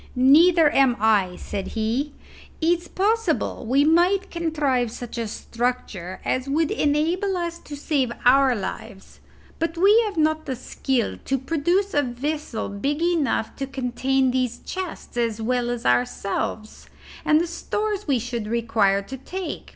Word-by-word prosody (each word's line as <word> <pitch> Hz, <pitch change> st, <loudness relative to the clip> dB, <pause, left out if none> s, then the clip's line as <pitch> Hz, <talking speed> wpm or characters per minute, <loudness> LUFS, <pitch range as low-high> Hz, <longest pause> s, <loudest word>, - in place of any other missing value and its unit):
"Neither 305 Hz, +5 st, +6 dB
am 265 Hz, -3 st, +4 dB
I," 205 Hz, -4 st, +2 dB
said 195 Hz, +1 st, -5 dB
he. 240 Hz, +7 st, -1 dB, 0.5 s
"It's 345 Hz, +1 st, +1 dB
possible 425 Hz, -, 0 dB
we 275 Hz, +4 st, +3 dB
might 360 Hz, +5 st, +3 dB
contrive 295 Hz, -8 st, 0 dB
such 240 Hz, +1 st, -7 dB
a 230 Hz, -, -2 dB
structure 225 Hz, -6 st, -4 dB
as 255 Hz, +1 st, -1 dB
would 310 Hz, +2 st, +1 dB
enable 335 Hz, +7 st, +1 dB
us 340 Hz, -1 st, -3 dB
to 295 Hz, -, -9 dB
save 280 Hz, -4 st, 0 dB
our 265 Hz, 0 st, +5 dB
lives; 200 Hz, 0 st, -7 dB, 0.4 s
but 330 Hz, +1 st, -2 dB
we 410 Hz, +6 st, +6 dB
have 400 Hz, -4 st, -6 dB
not 315 Hz, 0 st, +1 dB
the 260 Hz, -, -2 dB
skill 255 Hz, 0 st, -2 dB
to 270 Hz, -, 0 dB
produce 345 Hz, +8 st, 0 dB
a 290 Hz, -, +3 dB
vessel 265 Hz, -1 st, -3 dB
big 275 Hz, +10 st, -2 dB
enough 330 Hz, -9 st, 0 dB
to 270 Hz, -, -3 dB
contain 265 Hz, 0 st, 0 dB
those 250 Hz, -2 st, -1 dB
chests 370 Hz, -9 st, -6 dB
as 230 Hz, -2 st, 0 dB
well 240 Hz, +1 st, 0 dB
as 240 Hz, -1 st, -4 dB
ourselves, 195 Hz, -, -1 dB, 0.3 s
and 305 Hz, 0 st, +4 dB
the 340 Hz, -, +1 dB
stores 415 Hz, +4 st, -3 dB
we 275 Hz, -3 st, +3 dB
should 235 Hz, -2 st, -4 dB
require 220 Hz, -4 st, +1 dB
to 265 Hz, +7 st, -8 dB
take. 365 Hz, +8 st, -6 dB
270 Hz, 150 wpm, -23 LUFS, 235-330 Hz, 0.5 s, Neither